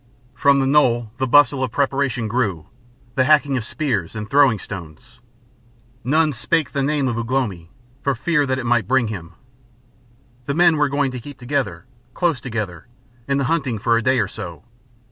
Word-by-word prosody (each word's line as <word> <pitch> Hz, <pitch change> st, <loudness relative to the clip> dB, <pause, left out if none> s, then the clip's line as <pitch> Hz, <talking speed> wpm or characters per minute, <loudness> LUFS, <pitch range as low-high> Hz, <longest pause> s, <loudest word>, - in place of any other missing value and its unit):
From 140 Hz, +2 st, +3 dB
the 135 Hz, -, +1 dB
knoll 120 Hz, -5 st, +2 dB
the 130 Hz, -, 0 dB
bustle 140 Hz, 0 st, +4 dB
of 130 Hz, -, -1 dB
preparation 135 Hz, -3 st, 0 dB
grew, 100 Hz, -9 st, -1 dB, 0.5 s
the 130 Hz, -, +2 dB
hacking 145 Hz, -2 st, +3 dB
of 125 Hz, -, -1 dB
spears 120 Hz, -, -2 dB
and 105 Hz, -1 st, -5 dB
throwing 140 Hz, -4 st, +4 dB
stones. 100 Hz, +6 st, -10 dB, 0.8 s
None 155 Hz, +4 st, +2 dB
spake 160 Hz, +6 st, -1 dB
the 140 Hz, -, -1 dB
name 140 Hz, 0 st, 0 dB
of 120 Hz, -2 st, -1 dB
Ugh 115 Hz, +1 st, -4 dB
lomi 105 Hz, -11 st, -2 dB, 0.3 s
for 140 Hz, -1 st, 0 dB
fear 145 Hz, +3 st, +1 dB
that 130 Hz, 0 st, 0 dB
it 125 Hz, -, -4 dB
might 120 Hz, -4 st, +1 dB
bring 130 Hz, -3 st, +2 dB
him. 85 Hz, -5 st, -7 dB, 1.1 s
The 140 Hz, -, -1 dB
men 170 Hz, -1 st, +4 dB
were 150 Hz, -1 st, +2 dB
going 140 Hz, -1 st, 0 dB
to 125 Hz, -, -6 dB
keep 140 Hz, +2 st, -10 dB
together, 135 Hz, +1 st, -3 dB, 0.3 s
close 170 Hz, -7 st, 0 dB
together, 105 Hz, -9 st, -5 dB, 0.4 s
in 140 Hz, 0 st, +1 dB
the 140 Hz, -, 0 dB
hunting 135 Hz, -5 st, 0 dB
for 115 Hz, +3 st, +1 dB
a 115 Hz, -, +2 dB
day 130 Hz, +2 st, +2 dB
or 105 Hz, -5 st, +1 dB
so. 85 Hz, -7 st, -8 dB
130 Hz, 185 wpm, -21 LUFS, 110-140 Hz, 1.1 s, bustle